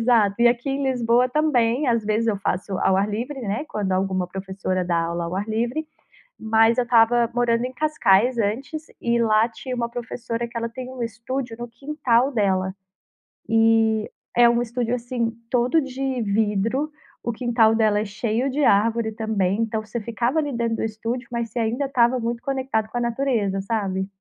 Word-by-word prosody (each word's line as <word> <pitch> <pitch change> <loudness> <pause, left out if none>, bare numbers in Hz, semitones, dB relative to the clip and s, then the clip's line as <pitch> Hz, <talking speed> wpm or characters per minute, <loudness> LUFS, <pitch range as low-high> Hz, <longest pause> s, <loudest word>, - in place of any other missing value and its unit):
Exato. 225 -4 +3
E 240 - +7
aqui 240 +3 0
em 275 +1 -1
Lisboa 245 -1 +2
também, 260 -2 +2
às 230 -2 +2
vezes 215 +2 0
eu 210 - +1
faço 190 0 -2
ao 190 - +3
ar 200 +2 +1
livre, 245 +7 -4
né, 215 +5 -2
quando 200 -3 -2
alguma 185 -1 0
professora 190 0 -3
dá 175 -1 +1
aula 170 +1 -1
ao 170 +2 -4
ar 200 +2 -2
livre. 240 +8 -1 0.5
Mas 225 +1 +3
eu 250 - +3
estava 235 0 +4
morando 240 -1 +1
em 255 - -4
Cascais 250 -5 +2
antes 245 +9 -2 0.2
e 235 0 +1
lá 220 0 +4
tinha 255 +2 -7
uma 235 -1 -1
professora 235 0 -4
que 235 - -7
ela 230 0 -1
tem 250 +2 -8
um 260 -1 -7
estúdio 235 +2 -4
no 240 0 -6
quintal 260 0 +1
dela. 190 -4 +1 0.7
Eh, 225 -1 +3 0.3
é 240 0 +7
um 235 0 +2
estúdio, 240 0 -2
assim, 235 -1 -2 0.2
todo 250 +6 +2
de 265 -1 -3
vidro. 220 +7 0 0.3
O 235 - -1
quintal 230 -1 +3
dela 215 -2 +3
é - - -2
cheio 220 +4 -1
de 290 +3 0
árvore 225 0 +3
também, 210 -3 0
então 220 -1 -1
você 225 +2 -5
ficava 235 +5 -1
ali 290 -2 -1
dentro 235 -1 -1
do - - -2
estúdio, 230 +3 -4
mas 235 -1 -2
você 225 - -9
ainda 235 +5 0
estava 255 -2 +2
muito 235 0 -3
conectado 260 -5 -1
com 245 - -4
a - - -2
natureza, 235 -5 0
sabe? 195 -2 -2
230 Hz, 185 wpm, -23 LUFS, 215-245 Hz, 0.7 s, E